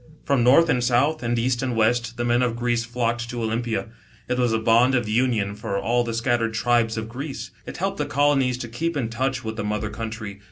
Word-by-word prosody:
From 140 Hz, -4 st, +2 dB
north 140 Hz, +7 st, +6 dB
and 125 Hz, -5 st, +1 dB
south, 135 Hz, +6 st, +2 dB
and 120 Hz, 0 st, -1 dB
east 120 Hz, +1 st, 0 dB
and 130 Hz, -3 st, -1 dB
west, 115 Hz, +1 st, +1 dB
the 120 Hz, -, -1 dB
men 120 Hz, +1 st, +2 dB
of 120 Hz, -2 st, 0 dB
Greece 120 Hz, -1 st, 0 dB
flocked 120 Hz, 0 st, -2 dB
to 120 Hz, -1 st, -4 dB
Olympia. 110 Hz, 0 st, -2 dB, 0.4 s
It 125 Hz, -, -1 dB
Was 120 Hz, -2 st, +2 dB
a 110 Hz, -, +2 dB
bond 115 Hz, +4 st, +4 dB
of 120 Hz, -2 st, +1 dB
\mion, 110 Hz, -3 st, +1 dB
for 105 Hz, -1 st, -3 dB
all 120 Hz, +4 st, +1 dB
the 115 Hz, -1 st, -3 dB
scattered 115 Hz, -1 st, 0 dB
tribes 115 Hz, -1 st, +1 dB
of 110 Hz, 0 st, -3 dB
Greece. 135 Hz, +5 st, -6 dB, 0.2 s
It -, -, -7 dB
helped -, -, -2 dB
the -, -, -1 dB
colonies 140 Hz, -3 st, +2 dB
to 125 Hz, -, -5 dB
keep 160 Hz, +8 st, -2 dB
in 120 Hz, -5 st, -1 dB
touch 130 Hz, +3 st, -2 dB
with 110 Hz, 0 st, -5 dB
the 105 Hz, -, -2 dB
mother 105 Hz, 0 st, -2 dB
country. 110 Hz, -2 st, -6 dB
120 Hz, 230 wpm, -23 LUFS, 115-125 Hz, 0.4 s, north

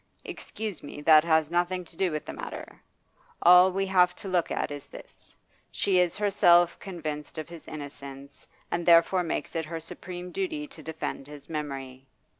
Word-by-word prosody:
'Excuse 215 Hz, -6 st, -6 dB
me, 145 Hz, -, -9 dB
that 155 Hz, 0 st, +7 dB
has 160 Hz, -2 st, +2 dB
nothing 175 Hz, +1 st, 0 dB
to 165 Hz, -, -14 dB
do 185 Hz, +1 st, 0 dB
with 155 Hz, 0 st, -4 dB
the -, -, -6 dB
matter. -, -, -8 dB, 0.6 s
All 180 Hz, +2 st, +8 dB
we 195 Hz, +1 st, 0 dB
have 180 Hz, -2 st, +3 dB
to -, -, -9 dB
look 180 Hz, -3 st, +1 dB
at -, -, -2 dB
is 145 Hz, -1 st, -7 dB
this. -, -, -12 dB, 0.3 s
She 190 Hz, -2 st, +2 dB
is 180 Hz, -2 st, +1 dB
herself 175 Hz, -4 st, +4 dB
convinced 155 Hz, -5 st, -6 dB
of 155 Hz, -, -5 dB
his 170 Hz, -2 st, -11 dB
innocence, 140 Hz, -2 st, -9 dB, 0.2 s
and 170 Hz, 0 st, -1 dB
therefore 170 Hz, +2 st, +5 dB
makes 165 Hz, -1 st, -3 dB
it 165 Hz, -1 st, -1 dB
her 165 Hz, +1 st, -5 dB
supreme 180 Hz, +2 st, -8 dB
duty 320 Hz, -6 st, -3 dB
to 275 Hz, -, -13 dB
defend 160 Hz, -3 st, -5 dB
his 145 Hz, -1 st, -11 dB
memory. 135 Hz, -4 st, -5 dB
170 Hz, 175 wpm, -27 LUFS, 150-180 Hz, 0.6 s, All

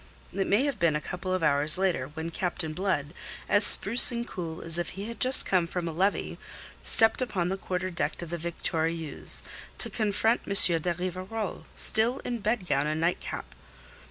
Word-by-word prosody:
It 195 Hz, -1 st, -3 dB
may 210 Hz, +6 st, +1 dB
have 280 Hz, -7 st, -4 dB
been 170 Hz, -3 st, 0 dB
a -, -, -1 dB
couple 185 Hz, +3 st, -7 dB
of 185 Hz, -2 st, -3 dB
hours 150 Hz, +1 st, +3 dB
later, 185 Hz, -9 st, -2 dB
when 160 Hz, +1 st, -6 dB
Captain 170 Hz, -2 st, -5 dB
Blood, 160 Hz, -4 st, -4 dB, 0.3 s
as 205 Hz, +1 st, +1 dB
spruce 230 Hz, +4 st, +8 dB
and 235 Hz, 0 st, -5 dB
cool 165 Hz, -2 st, -8 dB
as 165 Hz, +1 st, -2 dB
if 175 Hz, -, -5 dB
he 200 Hz, +2 st, -7 dB
had 235 Hz, -1 st, -10 dB
just 255 Hz, +1 st, +3 dB
come 180 Hz, -3 st, -1 dB
from 175 Hz, 0 st, -6 dB
a -, -, -4 dB
levee, 190 Hz, +5 st, -3 dB, 0.4 s
stepped 225 Hz, +2 st, +2 dB
upon 185 Hz, -8 st, -3 dB
the 190 Hz, -, -3 dB
quarter 185 Hz, 0 st, -5 dB
deck 170 Hz, -, -4 dB
of 170 Hz, -, -11 dB
the 175 Hz, -, -4 dB
Victoriense, 165 Hz, -2 st, +1 dB, 0.3 s
to -, -, +1 dB
confront 220 Hz, +1 st, -1 dB
M. 200 Hz, -, -4 dB, 0.3 s
de 175 Hz, -, -2 dB
Rivarol, 185 Hz, +4 st, -7 dB
still 230 Hz, +4 st, +5 dB
in 240 Hz, -1 st, -5 dB
bedgown 190 Hz, -, -2 dB
and 155 Hz, +1 st, -3 dB
nightcap. 165 Hz, -, -5 dB
180 Hz, 185 wpm, -26 LUFS, 165-205 Hz, 0.4 s, spruce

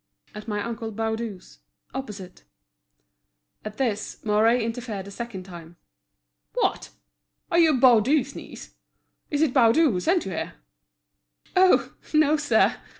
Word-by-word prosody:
"At 210 Hz, +1 st, -9 dB
my 210 Hz, -1 st, -2 dB
uncle 230 Hz, -1 st, -5 dB
Baudu's, 220 Hz, -, -5 dB, 0.3 s
opposite." 210 Hz, -9 st, -8 dB, 1.2 s
At 215 Hz, 0 st, -7 dB
this, 220 Hz, -6 st, -2 dB
Mouret 220 Hz, +3 st, +3 dB
interfered 225 Hz, -4 st, -4 dB
a -, -, -9 dB
second 225 Hz, -4 st, -6 dB
time. 175 Hz, -2 st, -12 dB, 0.8 s
"What! -, -, 0 dB, 0.6 s
are 340 Hz, -, +4 dB
you 315 Hz, -6 st, +4 dB
Baudu's 260 Hz, +3 st, +4 dB
niece? -, -, -10 dB, 0.6 s
Is 295 Hz, +1 st, +1 dB
it 285 Hz, -5 st, +1 dB
Baudu 265 Hz, +4 st, +5 dB
who 185 Hz, -, -1 dB
sent 340 Hz, -, +1 dB
you 195 Hz, -, -5 dB
here?" 170 Hz, -, -4 dB, 1.0 s
"Oh! 370 Hz, 0 st, +4 dB, 0.2 s
no, 305 Hz, 0 st, +4 dB
sir!" 290 Hz, -1 st, +2 dB
230 Hz, 125 wpm, -25 LUFS, 210-275 Hz, 1.2 s, Baudu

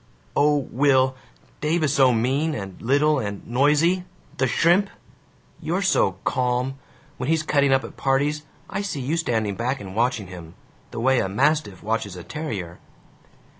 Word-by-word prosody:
"O 145 Hz, +1 st, +4 dB
Will, 130 Hz, -1 st, +3 dB, 0.4 s
Dave 155 Hz, +2 st, 0 dB
is 145 Hz, -2 st, +2 dB
so 135 Hz, -4 st, +5 dB
mean 135 Hz, +7 st, 0 dB
and 95 Hz, -5 st, -7 dB
little 145 Hz, +4 st, +3 dB
and 100 Hz, -4 st, -5 dB
noisy 150 Hz, +8 st, +2 dB, 0.3 s
the 130 Hz, -, +2 dB
shrimp! 175 Hz, +9 st, +3 dB, 0.7 s
You're 180 Hz, +5 st, -1 dB
so 140 Hz, -, +3 dB
calm. 125 Hz, +1 st, -1 dB, 0.4 s
When 125 Hz, +3 st, -3 dB
he's 160 Hz, -1 st, +2 dB
cutting 140 Hz, -3 st, +2 dB
up 135 Hz, 0 st, +3 dB
at -, -, -10 dB
parties 145 Hz, +3 st, 0 dB, 0.2 s
I -, -, -3 dB
see 200 Hz, -8 st, -4 dB
you 135 Hz, +5 st, -1 dB
standing 110 Hz, -10 st, 0 dB
back 125 Hz, +6 st, -2 dB
and 95 Hz, -1 st, -9 dB
watching 115 Hz, -2 st, 0 dB
him 85 Hz, -3 st, -11 dB, 0.3 s
the 120 Hz, -, -6 dB
way 130 Hz, +2 st, +3 dB
a 95 Hz, -, -1 dB
mastiff 135 Hz, -, 0 dB
watches 110 Hz, -3 st, -2 dB
a 90 Hz, -, -8 dB
terrier." 100 Hz, -, -5 dB
135 Hz, 160 wpm, -23 LUFS, 115-150 Hz, 0.7 s, so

